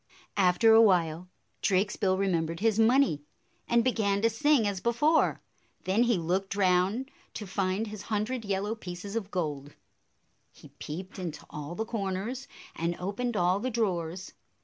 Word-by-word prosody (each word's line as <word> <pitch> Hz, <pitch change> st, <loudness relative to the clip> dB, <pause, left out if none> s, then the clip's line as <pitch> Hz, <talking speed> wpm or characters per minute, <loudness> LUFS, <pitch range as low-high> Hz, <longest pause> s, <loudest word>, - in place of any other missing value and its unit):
After 195 Hz, +4 st, +5 dB
a 225 Hz, -, +8 dB
while, 180 Hz, -4 st, +2 dB, 0.3 s
Drakesbill 190 Hz, 0 st, +1 dB
remembered 170 Hz, -4 st, 0 dB
his 220 Hz, +1 st, +2 dB
money, 230 Hz, -, +4 dB, 0.5 s
and 235 Hz, -1 st, +3 dB
began 210 Hz, -5 st, +1 dB
to 230 Hz, -, +4 dB
sing 275 Hz, -1 st, +3 dB
as 200 Hz, -2 st, -2 dB
before. 295 Hz, +7 st, +2 dB, 0.4 s
Then 195 Hz, +5 st, +1 dB
he 240 Hz, -3 st, +3 dB
looked 185 Hz, +4 st, -1 dB
round 195 Hz, +7 st, +1 dB, 0.2 s
to 210 Hz, -, -5 dB
find 195 Hz, +2 st, -1 dB
his 210 Hz, -2 st, -7 dB
hundred 225 Hz, +3 st, -2 dB
yellow 200 Hz, +1 st, -1 dB
pieces 195 Hz, -1 st, -7 dB
of 210 Hz, -4 st, -3 dB
gold. 150 Hz, -6 st, -4 dB, 0.8 s
He -, -, -16 dB
peeped 185 Hz, +6 st, -7 dB
into 170 Hz, -5 st, -6 dB
all 150 Hz, +3 st, -6 dB
the 220 Hz, -, -2 dB
corners 220 Hz, +3 st, -3 dB, 0.3 s
and 170 Hz, +1 st, -1 dB
opened 205 Hz, +5 st, -2 dB
all 180 Hz, +1 st, +2 dB
the 255 Hz, +5 st, -2 dB
drawers. 185 Hz, -6 st, -2 dB
200 Hz, 150 wpm, -29 LUFS, 180-225 Hz, 0.8 s, a